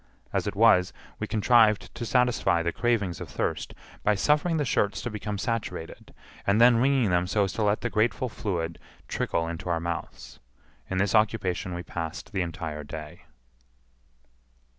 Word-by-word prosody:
As - - 0
it - - -3
was, 100 -4 +5 0.3
we 105 - -3
contrived 110 0 +3
to 120 - -5
satisfy 125 -7 +2
the 85 - 0
cravings 105 -8 0
of - - -7
thirst - - -3 0.3
by 105 - +2
suffering 150 - +2
the 145 - 0
shirts 105 -3 +1
to 120 - -3
become 105 -1 -4
saturated, 100 -7 -4 0.4
and 100 +2 +3
then 120 0 +7
wringing 130 -4 +3
them 90 0 +2
so 100 +2 +2
as 95 - -2
to - - -3
let 105 0 +2
the - - -1
grateful 115 +4 +1
fluid 85 -7 -3 0.3
trickle 80 0 -1
into 85 +1 -5
our 85 -1 +1
mouths. 85 0 -6 0.5
In 95 - -2
this 100 +1 +1
occupation 100 -5 +1
we 90 - -5
passed 80 -2 -6
the 95 - -1
entire 80 -3 -4
day. 75 +1 -9
100 Hz, 165 wpm, -27 LUFS, 85-115 Hz, 0.5 s, then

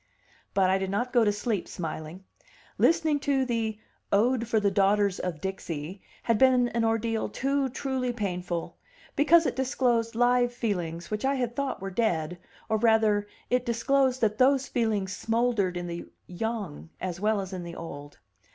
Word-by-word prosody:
But 190 -1 +4
I 190 - +2
did 190 0 -2
not 240 +6 -1
go 240 -2 +5
to 210 - +3
sleep 205 -2 -2
smiling; 160 +1 -6 0.6
listening 320 -3 +3
to 275 -2 +1
the 225 -3 -1 0.3
"Ode 235 +3 +2
for 225 -1 +2
the 205 -1 +2
Daughters 200 0 +2
of 175 -4 -3
Dixie" 185 -2 -5 0.2
had 230 -2 +2
been 255 -2 +5
an 230 0 -1
ordeal 225 0 0
too 275 0 0
truly 260 -1 -2
painful, 180 -6 -3 0.4
because 330 +3 +5
it - - 0
disclosed 245 -3 +1
live 245 +1 +3
feelings 175 -8 -3
which 210 0 -2
I 275 +1 +2
had 245 -2 -2
thought 275 -7 -2
were 195 - -4
dead, 180 -6 0 0.3
or 220 - +1
rather, 215 -2 +3 0.2
it 250 0 +3
disclosed 255 +2 +1
that 215 -1 +1
those 270 +1 +4
feelings 210 -5 -1
smouldered 225 -5 0
in 175 - -4
the 170 0 -6 0.2
young 195 -4 -4
as 180 -2 -4
well 215 +1 +1
as 190 -1 -5
in 185 - -4
the 170 -1 -7
old. 145 -3 -8
220 Hz, 170 wpm, -27 LUFS, 190-245 Hz, 0.6 s, go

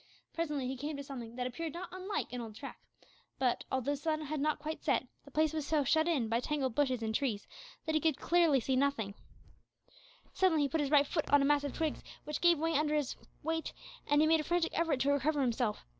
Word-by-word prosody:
Presently 300 -5 -2
he 265 - -3
came 290 +3 -4
to 280 - -5
something 245 -4 -7
that 250 0 -2
appeared 315 +5 -4
not 350 +1 -6
unlike 370 -5 -4
an 250 - -3
old 220 -2 -8
track; 275 +4 -8 0.6
but, 255 -3 0
although 265 +1 0
the - - 0
sun 310 +1 -1
had 305 0 -3
not 305 +1 +1
quite 310 +1 -5
set, 275 -3 +2 0.2
the - - -12
place 310 +2 +1
was 310 -2 -2
so 305 -2 +2
shut 315 +4 +3
in 285 -10 +1
by 230 +1 +1
tangled 270 -2 -1
bushes 260 -3 +1
and 220 0 -1
trees 220 -5 -1 0.4
that 315 - -1
he 310 - +2
could 320 -3 +2
see 300 -7 +3
nothing 260 -6 +1
distinctly. 200 - -11 1.2
Suddenly 355 -5 +3
he 280 - +1
put 315 +3 0
his 285 - 0
right 290 -1 +5
foot 310 +2 -2
on 285 -1 +5
a - - +3
mass 290 0 +3
of 285 - -4
twigs, 320 -2 -1 0.2
which 300 -1 -4
gave 345 -1 +5
way 325 +2 0
under 300 0 +2
his 290 -4 -1 0.3
weight, 325 +1 -2 0.3
and 290 0 +4
he - - +5
made 320 0 +5
a - - -1
frantic 345 +1 +1
effort 320 -6 +1
to 280 - +3
recover 285 +2 +1
himself. 240 -3 0
290 Hz, 235 wpm, -33 LUFS, 265-315 Hz, 1.2 s, right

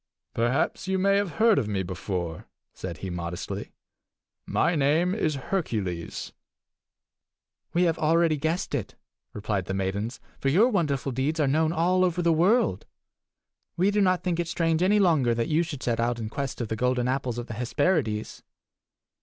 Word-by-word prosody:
"Perhaps 120 +9 0
you 190 0 +1
may 195 +1 +3
have 200 -3 -1
heard 220 -1 +4
of 105 - -2
me 100 -2 -1
before," 90 -3 -4 0.3
said 85 -3 -6
he 95 - -4
modestly. 85 0 -5 0.8
"My 175 - +2
name 155 +5 +2
is 155 -8 0
Hercules." 110 - -3 1.4
"We 175 - +4
have 165 -2 +1
already 165 +1 +3
guessed 160 +6 -2
it," 125 -8 -3 0.4
replied 105 -3 -2
the 95 - -3
maidens, 100 +5 -2 0.2
"for 135 - +1
your 205 - +5
wonderful 145 - 0
deeds 135 +6 -1
are 150 - +3
known 155 +3 +2
all 180 +3 +2
over 180 -1 +1
the 170 -1 +4
world. 190 +10 +2 0.9
We 190 +4 +3
do 205 0 +2
not 185 -2 +2
think 175 -2 -1
it 170 - -1
strange 165 -1 0
any 195 +3 +4
longer 155 - +3
that 115 0 -1
you 160 +2 +3
should 160 -6 -5
set 115 -1 0
out 120 +1 +1
in 110 -2 -4
quest 140 0 -4
of 115 - -3
the 110 - -1
golden 125 +1 +1
apples 130 -2 -1
of 120 - -4
the 120 - -7
Hesperides. 125 - -1
145 Hz, 170 wpm, -26 LUFS, 115-175 Hz, 1.4 s, your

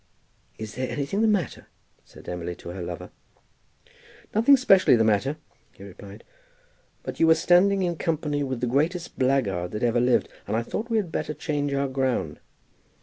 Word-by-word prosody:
"Is 110 -1 -7
there 130 +2 -3
anything 145 +9 -2
the 225 - +4
matter?" 200 - -1 0.4
said - - -16
Emily 90 0 -4
to 85 - -10
her 90 +1 -6
lover. 85 0 -6 1.2
"Nothing 235 +6 +6
specially 195 - +5
the 115 - +3
matter," 110 +7 +1 0.4
he - - -14
replied; 100 +2 -12 0.8
"but - - -6
you 165 - +5
were 160 - +7
standing 190 +3 +3
in 175 -2 -1
company 150 -3 -1
with 130 -3 -4
the - - +1
greatest 160 +8 -1
blackguard 115 -10 +1
that 105 - -3
ever 120 0 +2
lived, 125 0 +2 0.2
and 110 - 0
I 115 - 0
thought 220 - -4
we 225 - +1
had 190 -6 -1
better 150 - -3
change 145 -1 -2
our 140 0 0
ground." 130 - -1
135 Hz, 175 wpm, -25 LUFS, 110-170 Hz, 1.2 s, were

